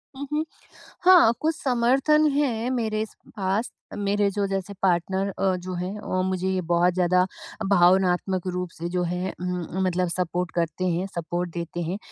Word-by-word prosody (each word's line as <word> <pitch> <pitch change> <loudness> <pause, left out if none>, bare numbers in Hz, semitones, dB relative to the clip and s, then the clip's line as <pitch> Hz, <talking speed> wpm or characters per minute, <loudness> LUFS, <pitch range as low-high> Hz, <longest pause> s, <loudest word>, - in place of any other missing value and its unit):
हुँ, 280 +1 -6
हुँ। 305 +1 0 0.6
हाँ, 355 -10 +7
कुछ 320 +1 +1
समर्थन 270 +5 +3
हैं 250 -5 0
मेरे 220 -3 -1
स - - -19 0.2
पास, 195 +4 -1 0.3
मेरे 205 0 +1
जो 200 0 -1
जैसे 195 0 -3
पार्टनर 190 +1 +1
अ, 190 -1 0
जो 185 +1 -6
हैं 180 +4 -4
अ, 185 -3 -1
मुझे 185 0 -1
ये 190 -1 0
बहुत 175 +1 +4
ज़्यादा 180 0 +3 0.4
भावनात्मक 185 0 +3
रूप 180 0 -3
से 170 +1 -5
जो 180 0 0
है 180 +2 -2
उम 180 - -2
उम, 190 +3 -3
मतलब 180 0 +1
सपोर्ट 180 0 -1
करते 170 +1 -1
हैं 180 +1 0
सपोर्ट 175 +1 -2
देते 170 0 -4
हैं। 170 +4 -2
185 Hz, 175 wpm, -25 LUFS, 180-215 Hz, 0.6 s, हाँ